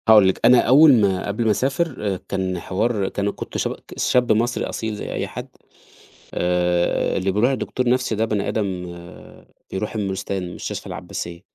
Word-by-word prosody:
هاقول 105 -3 +8
لِك، 95 - -1
أنا 125 +1 +7
أوّل 145 +4 +7
ما 95 -2 +1
قبل 105 +3 -1
ما 110 - +4
أسافر 130 - -1
كان 95 -2 -2
حوار 100 +2 -1
كان 100 0 -1
كنت - - -6
شب - - -1 0.2
شاب 125 -2 +2
مصري 120 +3 +1
أصيل 110 -1 -4
زي - - -6
أي - - -2
حد - - -7 0.9
آآ، 90 0 +1
اللي 95 +1 0
بيروح 110 +7 +2
لدكتور 125 -1 -1
نفسي 125 -2 +1
ده 110 +2 +1
بني 105 -3 -1
آدم 95 -4 -2
آآ، 85 0 -13 0.2
بيروح 105 +4 -3
المورستان 95 -3 -3
مستشفى - - -5
العباسية، 85 0 -6
105 Hz, 165 wpm, -22 LUFS, 95-120 Hz, 0.9 s, هاقول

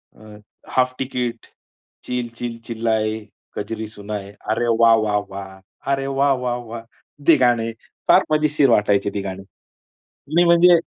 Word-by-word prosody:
अ, 105 -1 -14 0.3
half 130 0 +1
ticket, 125 -3 -3 0.6
chill 125 -1 -3
chill 120 -1 -4
चिल्लाए 110 -2 0 0.4
कजरी 110 +1 -4
सुनाए, 105 -1 -7 0.2
अरे 115 +2 +1
वाह 115 -1 +7
वाह 105 -1 +1
वाह! 95 0 -8 0.3
अरे 135 0 0
वाह 140 0 +4
वाह 120 -1 0
वाह! 115 0 -7 0.5
ते 165 - +8
गाणे 115 -2 +2 0.4
फार - - +6
मजेशीर 150 -3 +3
वाटायचे 105 -2 +3
ते 100 - -1
गाणी 95 0 -6 0.8
नाही. 170 +4 +3
म्हणजे 170 0 +6
115 Hz, 135 wpm, -21 LUFS, 105-130 Hz, 0.8 s, ते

